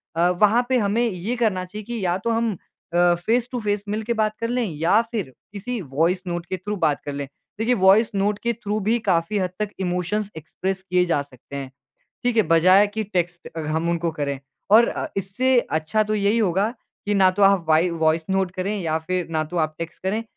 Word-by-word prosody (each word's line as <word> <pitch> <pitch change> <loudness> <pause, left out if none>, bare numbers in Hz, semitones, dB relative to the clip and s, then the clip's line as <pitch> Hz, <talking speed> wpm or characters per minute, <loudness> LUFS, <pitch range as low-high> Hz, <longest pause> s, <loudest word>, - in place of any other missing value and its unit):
अ, 170 +2 +3
वहाँ 210 +7 +3
पे 260 - +3
हमें 210 0 +1
ये 195 +5 -3
करना 215 -6 0
चाहिए 210 +4 -8
कि 235 -2 -4
या 175 0 +1
तो 215 +5 -3
हम 230 0 +1 0.4
अ, 175 0 +4
फ़ेस-टू-फ़ेस, 225 -3 0
मिलके 220 +3 -1
बात 215 -1 0
कर 230 - 0
लें, 245 0 0
या 170 +8 +4
फिर 205 - -3 0.2
किसी 235 +4 -4
वॉइस 165 +5 0
नोट 175 -1 -3
के 185 - -4
थ्रू 205 +4 -4
बात 155 -5 +1
कर 145 - -4
लें। 140 0 -4 0.3
देखिए, 230 +3 +2
वॉइस 205 +1 +5
नोट 200 +1 0
के 235 0 +1
थ्रू 210 -2 -3
भी 220 +4 +1
काफ़ी 185 -2 0
हद 185 -1 0
तक 210 -1 -1
इमोशंस 185 +3 -1
एक्सप्रेस 190 +5 -4
किए 180 0 +3
जा 165 -5 +1
सकते 140 -1 -12
हैं। 135 -2 -5 0.5
ठीक 245 -1 +1
है? 220 - +6
बजाय 185 +4 +5
कि 215 +2 -4
टेक्स्ट 175 -3 -3
अ, - - -2
हम 160 +2 -1
उनको 170 0 0
करें। 140 -1 -1 0.3
और 225 +3 +7
अ, - - -3
इससे 245 +7 +1 0.2
अच्छा 215 +8 +1
तो 215 0 -2
यही 205 +2 +2
होगा 200 0 +1 0.4
कि 205 - +1
ना 190 -2 +5
तो 195 +2 -1
आप 195 -3 +5
वाइ 160 +3 +4
वॉइस 160 +1 +2
नोट 190 -1 +1
करें 195 +3 -1
या 160 -2 0
फिर 180 +2 -3
ना 155 -1 0
तो 165 +3 -7
आप 155 - -17
टेक्स्ट 165 0 -7
करें। 200 +4 -1
190 Hz, 215 wpm, -23 LUFS, 170-215 Hz, 0.5 s, और